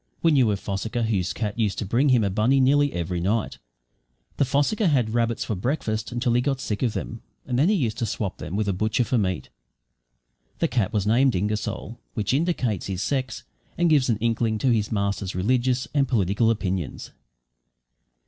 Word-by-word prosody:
We 165 - +5
knew 130 -6 +4
a - - +1
fossicker 105 +5 -3
whose 100 -5 0
cat 105 0 -4
used 105 -3 0
to - - -2
bring 125 +9 +2
him 125 -4 +4
a 100 - 0
bunny 115 +7 +3
nearly 145 +2 +4
every 85 +1 -3
night. 105 +5 -1 0.8
The 140 - +3
fossicker 145 - +1
had 125 -8 +1
rabbits 115 -1 0
for - - -2
breakfast 110 0 -2
until 120 0 0
he 120 - +3
got 135 0 -1
sick 105 -5 -3
of 120 -4 +1
them, 115 - -5 0.2
and 125 -1 -1
then 155 +7 +4
he 215 - +3
used 120 - -1
to 115 - -1
swap 100 -2 -3
them 85 - -5
with 105 0 0
a 100 - +1
butcher 110 +6 +1
for 120 0 0
meat. 95 -9 -2 1.1
The - - +1
cat 115 -6 0
was 105 -2 0
named 125 +3 +3
Ingersoll, 105 +4 -3 0.2
which 105 +1 -1
indicates 135 - 0
his 95 -1 -3
sex 130 -4 -2 0.3
and 175 -1 +3
gives 140 -4 +3
an 115 - +2
inkling 115 0 0
to 125 +3 +2
his 110 -3 0
master's 100 -2 -1
religious 125 +6 +1
and 140 -2 +2
political 110 -1 +2
opinions. 95 -8 -2
115 Hz, 195 wpm, -24 LUFS, 100-130 Hz, 1.1 s, We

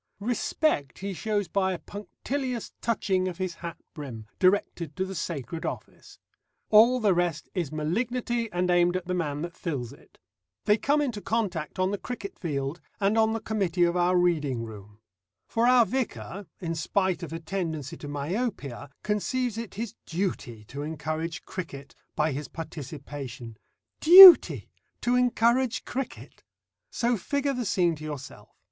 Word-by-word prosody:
Respect 225 - 0
he 195 +1 -4
shows 205 +1 -1
by 190 +1 0
a - - -3
punctilious 245 - -5
touching 195 -5 0
of 180 -2 -5
his 185 -2 -2
hat 170 -2 -6 0.2
brim, 130 -8 -8
directed 180 -5 +1
to 190 - -1
the 190 - -6
sacred 160 -3 -4
office; - - -7 0.5
all 230 +4 +7
the 210 -4 +3
rest 175 -3 -1
is 170 -7 -2
malignity, 230 +8 -1
and 180 0 0
aimed 175 0 +3
at 185 - -6
the 180 - -2
man 150 -4 -2
that 170 0 -6
fills 135 -7 -4
it. - - -20 0.5
They 210 +1 +4
come 290 +1 +2
into 235 -7 -3
contact 195 -9 -2
on 185 +1 +1
the 205 - -3
cricket 210 -5 -7
field, 145 -1 -3 0.2
and 200 +2 +2
on 220 0 +3
the 225 - -2
committee 190 -6 0
of 170 0 +2
our 180 +1 +3
reading 150 -9 +1
room. 105 -1 -11 0.5
For 230 +1 +1
our 250 -2 +6
vicar, 200 - -4
in 165 -3 -3
spite 185 +2 0
of 170 - -6
a 165 - -4
tendency 160 -4 -4
to 145 - -9
myopia, 145 - -3
conceives 230 +3 -1
it 230 -3 -6
his 225 0 -4
duty 165 - -3
to 140 +7 -8
encourage 160 +2 -4
cricket 140 -7 -7 0.2
by 155 +1 +1
his 145 +2 -4
participation. 140 -6 -8 0.4
Duty 360 +2 +10 0.3
to 245 - +1
encourage 245 0 +2
cricket! 265 +1 -6 0.5
So 240 0 0
figure 280 +7 -1
the 250 -2 -3
scene 180 -4 +2
to 155 - -11
yourself. 145 -3 -8
180 Hz, 155 wpm, -27 LUFS, 155-220 Hz, 0.5 s, Duty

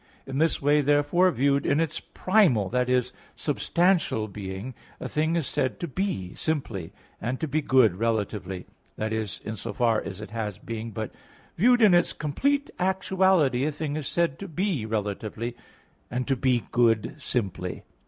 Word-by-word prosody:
In 135 +1 -3
this 160 0 +2
way, 145 +1 +3
therefore, 145 +6 +3
viewed 140 -2 +2
in 145 - +2
its 160 -1 -1
primal 165 - +2
(i.e. 125 0 +3 0.3
substantial) 165 - +1
being 100 +4 -6 0.3
a - - -4
thing 160 +2 0
is 165 -4 0
said 130 -4 -1
to 170 - -3
be 140 - -2
simply, 115 - -3 0.3
and 125 +4 -2
to 160 - -1
be 155 +2 0
good 125 -10 +4
relatively 100 -4 -2 0.3
(i.e. 110 0 -1 0.2
in 110 - -3
so 100 - -6
far 115 -3 +2
as 95 - -7
it 105 -1 -8
has 105 -4 -3
being) 115 0 -5
but 110 0 -5 0.4
viewed 245 +5 +5
in 205 -4 +7
its 175 -1 +3
complete 280 - 0
actuality, 190 -7 +2
a 155 - +1
thing 150 0 -3
is 155 -3 -3
said 170 -6 0
to 200 - -6
be 175 - -1
relatively, 110 +2 -3 0.5
and 125 +1 -2
to 135 - +2
be 125 -2 +1
good 115 -1 +2
simply. 95 -9 -3
130 Hz, 165 wpm, -26 LUFS, 110-160 Hz, 0.5 s, in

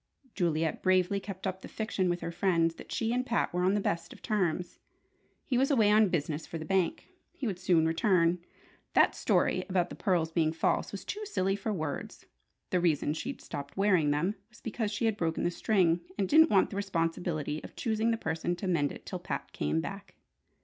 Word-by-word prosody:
Juliet 165 -4 0
bravely 185 +1 +3
kept 195 -1 -8
up 190 0 -3
the - - -8
fiction 200 -4 -1
with 175 0 -1
her 170 - -3
friends 170 -2 +2
that - - -12
she 225 0 0
and 250 +1 +1
Pat 235 -7 0
were 180 - 0
on 185 +2 +3
the - - +2
best 170 -4 -2
of - - -13
terms. 180 -4 -1 0.7
He 250 -2 +1
was 270 - +3
away 220 -7 +4
on 215 -1 +5
business 155 -2 -2
for 165 - -5
the 160 - -6
bank. 190 - 0 0.2
He 275 - -5
would 195 -6 -2
soon 175 -3 +3
return. 170 +1 +3 0.5
That - - +5
story - - +1
about 180 -2 +1
the - - -6
pearls 175 -5 +1
being 160 -1 +1
false 165 - 0
was - - -7
too 425 0 -4
silly 195 - 0
for 205 +2 -3
words! 155 -7 -4 0.5
The 180 - +3
reason 155 -4 +1
she'd 265 - -5
stopped 140 +3 -7
wearing 185 -7 +3
them 150 +7 +1 0.2
was 215 - -18
because 225 -1 -2
she 230 +2 -1
had 220 -2 +1
broken 165 -3 -1
the 175 - +1
string, 175 -3 +2 0.2
and 195 -2 +1
didn't 320 - +6
want 195 - +3
the 195 - -4
responsibility 165 -5 -2
of - - -10
choosing 225 -1 0
the 230 - +1
person 165 -2 -2
to 190 - -5
mend 155 -6 +1
it - - -11
till - - -5
Pat - - -5
came 75 +2 0
back. - - -8
180 Hz, 210 wpm, -30 LUFS, 165-210 Hz, 0.7 s, didn't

